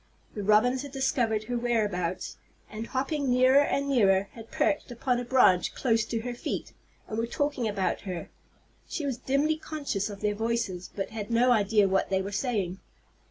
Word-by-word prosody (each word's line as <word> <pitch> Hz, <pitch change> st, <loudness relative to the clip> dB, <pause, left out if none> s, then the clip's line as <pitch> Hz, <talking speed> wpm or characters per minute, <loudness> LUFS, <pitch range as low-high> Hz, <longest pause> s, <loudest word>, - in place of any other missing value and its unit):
The 210 Hz, -, -4 dB
robins 215 Hz, +6 st, +3 dB
had 285 Hz, -1 st, -8 dB
discovered 250 Hz, -5 st, 0 dB
her 240 Hz, +2 st, -2 dB
whereabouts, 205 Hz, -7 st, -1 dB, 0.3 s
and, 220 Hz, +1 st, -5 dB
hopping 275 Hz, +1 st, -1 dB
nearer 255 Hz, +3 st, +5 dB
and 280 Hz, 0 st, -1 dB
nearer, 200 Hz, -7 st, +3 dB
had 225 Hz, -1 st, -12 dB
perched 300 Hz, -2 st, 0 dB
upon 245 Hz, +1 st, -1 dB
a -, -, -3 dB
branch 235 Hz, -8 st, +3 dB
close 225 Hz, -3 st, +1 dB
to 225 Hz, -1 st, -3 dB
her 245 Hz, +1 st, -4 dB
feet, 240 Hz, -, -5 dB, 0.3 s
and 220 Hz, -, -3 dB
were 230 Hz, -, -1 dB
talking 270 Hz, -2 st, -1 dB
about 200 Hz, -3 st, -1 dB
her. 185 Hz, -4 st, -6 dB, 0.6 s
She 305 Hz, -, -4 dB
was 265 Hz, -4 st, -2 dB
dimly 285 Hz, +4 st, +1 dB
conscious 280 Hz, -11 st, -3 dB
of 200 Hz, -1 st, -9 dB
their 210 Hz, 0 st, +1 dB
voices, 220 Hz, -5 st, -2 dB
but 195 Hz, -, -3 dB
had 215 Hz, -2 st, -5 dB
no 240 Hz, +2 st, +4 dB
idea 210 Hz, -2 st, +4 dB
what 190 Hz, 0 st, +1 dB
they 190 Hz, 0 st, +1 dB
were 200 Hz, -, -5 dB
saying. 200 Hz, -5 st, -2 dB
230 Hz, 180 wpm, -28 LUFS, 205-260 Hz, 0.6 s, nearer